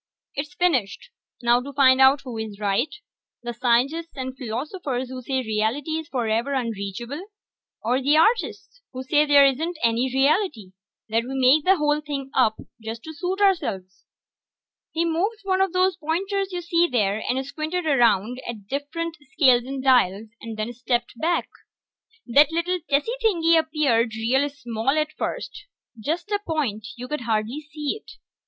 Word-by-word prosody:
"It's 295 +4 -5
finished. 270 - 0 0.3
Now 240 +1 +4
to 280 +2 -8
find 260 -1 +5
out 265 +1 +6
who 250 -3 -8
is 215 -2 -6
right, 210 +8 0 0.5
the 240 0 -4
scientists 255 +8 0
and 260 0 -4
philosophers 260 - -4
who 255 0 -6
say 260 +1 -1
reality 220 +7 -1
is 320 - -8
forever 240 0 -1
unreachable, 235 - -4 0.6
or 250 +4 +1
the 290 +3 +3
artists 470 +6 +1
who 255 0 -5
say 295 +3 +2
there 285 -1 +7
isn't 315 +6 0
any 235 +3 +2
reality 270 - +1 0.4
that 230 +2 +1
we 265 +2 -5
make 265 +4 +5
the 380 +1 +5
whole 300 -1 +1
thing 280 -3 -5
up 220 -4 +3 0.3
to 225 +1 -4 0.2
suit 365 +6 -3
ourselves." 195 - 0 0.9
He 330 +1 0
moved 385 +7 -1
one 380 -1 +1
of 385 -2 +2
those 370 0 +2
pointers 385 +5 -2
you 355 -1 -3
see 340 0 +2
there, 215 -3 +1
and 265 +2 0
squinted 315 +5 -3
around 245 -4 +2
at 235 - -3
the 215 +7 -4
different 335 +3 -5 0.2
scales 255 -5 +4
and 265 0 -5
dials, 225 -5 +3
and 225 -1 -7
then 215 +3 -3
stepped 240 0 -2
back. 340 +2 0 0.8
That 280 +5 +5
little 345 +2 0
tessy 290 +10 +2
thing 405 -8 +1
appeared, 290 -8 +2
real 260 +6 +1
small 245 0 -2
at 310 0 0
first. 405 - -5 0.3
Just 335 - -3
a 410 - +1
point; 255 - -2
you 250 +1 -7
could 300 0 -3
hardly 225 +3 -1
see 300 +7 -3
it. 440 - -14
270 Hz, 160 wpm, -24 LUFS, 235-320 Hz, 0.9 s, there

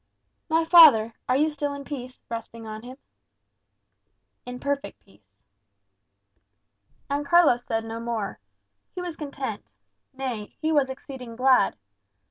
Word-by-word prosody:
"My 325 +1 +2
father, 290 -10 +8 0.2
are 255 - +3
you 305 +2 +2
still 290 -1 -3
in 280 - -7
peace, 255 -3 -7
resting 230 0 -7
on 215 0 -7
him?" 250 +3 -11 1.5
"In 250 0 -6
perfect 280 +1 -3
peace." 100 0 -25 1.8
And 285 +1 -1
Carlos 285 -5 +4
said 225 -2 -2
no 225 0 -5
more. 230 -4 -4 0.6
He - - -4
was 355 -2 -5
content; 280 -8 -5 0.5
nay, 250 -6 -5
he 315 0 0
was 285 -4 +2
exceeding 265 -4 -8
glad. 255 -4 +3
260 Hz, 125 wpm, -25 LUFS, 230-290 Hz, 1.8 s, father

